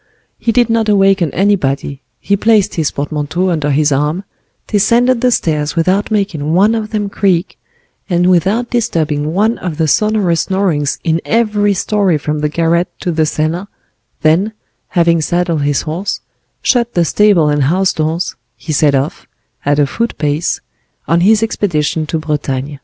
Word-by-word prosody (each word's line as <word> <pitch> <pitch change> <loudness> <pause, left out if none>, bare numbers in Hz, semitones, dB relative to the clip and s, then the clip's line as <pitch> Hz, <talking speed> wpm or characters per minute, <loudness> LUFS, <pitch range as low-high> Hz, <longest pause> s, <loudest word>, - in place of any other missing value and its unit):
He 230 - 0
did 240 0 +3
not 225 -2 +1
awaken 195 -5 +3
anybody, 145 -8 0 0.2
he 200 - 0
placed 215 0 +2
his 160 -3 0
portmanteau 155 +5 -2
under 150 -3 -1
his 145 +1 +2
arm, 150 +7 0 0.4
descended 235 +4 +2
the 250 - +3
stairs 150 -9 0
without 185 +5 +1
making 185 -8 -1
one 205 +5 +4
of 220 -2 -3
them 210 -2 -2
creak, 190 -3 -1 0.5
and 175 -1 +2
without 190 +7 +1
disturbing 155 -11 -1
one 215 +6 +1
of 170 -5 -5
the 160 - +1
sonorous 205 -3 +1
snorings 180 -7 0
in 165 0 0
every 210 -3 +1
story 195 -3 +1
from 150 +1 -3
the 150 0 0
garret 170 +3 +1
to 180 - -1
the 160 -1 +1
cellar, 160 +6 -2 0.6
then, 175 +8 +2 0.3
having 170 -2 +2
saddled 170 -1 0
his 145 -1 0
horse, 170 +6 -3 0.4
shut 240 -2 +1
the 175 -1 +3
stable 200 -5 +3
and 145 -2 +1
house 185 +6 +1
doors, 160 +3 -2 0.2
he 155 - -5
set 145 -1 +3
off, 140 +6 -3 0.4
at 145 0 +2
a 145 - +4
foot 230 +11 -3
pace, 150 +2 -1 0.5
on 165 +3 +2
his 215 +4 +4
expedition 160 -7 -1
to 160 - -1
Bretagne. 145 -2 -3
170 Hz, 160 wpm, -14 LUFS, 150-205 Hz, 0.6 s, one